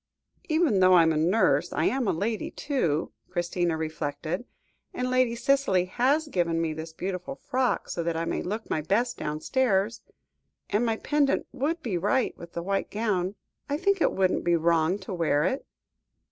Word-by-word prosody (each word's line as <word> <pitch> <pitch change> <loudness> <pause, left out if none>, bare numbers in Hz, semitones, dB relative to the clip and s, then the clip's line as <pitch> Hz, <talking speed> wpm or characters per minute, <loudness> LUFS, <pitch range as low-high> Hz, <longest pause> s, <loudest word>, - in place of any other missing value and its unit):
"Even 310 - +3
though 185 0 +6
I 170 - +7
am 160 0 +3
a - - 0
nurse, 180 +8 +2
I - - 0
am 260 -3 +1
a - - +3
lady, 215 +6 -2
too," 170 - -1 0.2
Christina 175 -1 -1
reflected; 160 +5 -3 0.5
"and 250 0 -1
Lady 255 -2 +2
Cicely 240 -8 +2
has 270 +11 +1
given 170 - 0
me 165 -1 -1
this 160 +1 -7
beautiful 180 +8 -4
frock, 255 -2 -1
so 170 - -3
that 165 -1 -1
I 165 - -1
may - - -2
look 215 +5 -4
my 155 - -1
best 235 +10 0
downstairs, 195 - 0 0.7
and, 210 +3 +2
my 225 -2 0
pendant 290 +1 +1
would 320 +4 -2
be 195 -8 -1
right 210 +8 +1
with 170 0 -12
the 170 - -4
white 195 +2 -1
gown. 205 -3 -1 0.3
I 285 - 0
think 390 +2 +1
it - - +4
wouldn't 190 -1 +1
be 175 0 +3
wrong 165 +2 +2
to 195 -1 -7
wear 155 -4 +1
it." 260 - -1
190 Hz, 180 wpm, -27 LUFS, 170-250 Hz, 0.7 s, I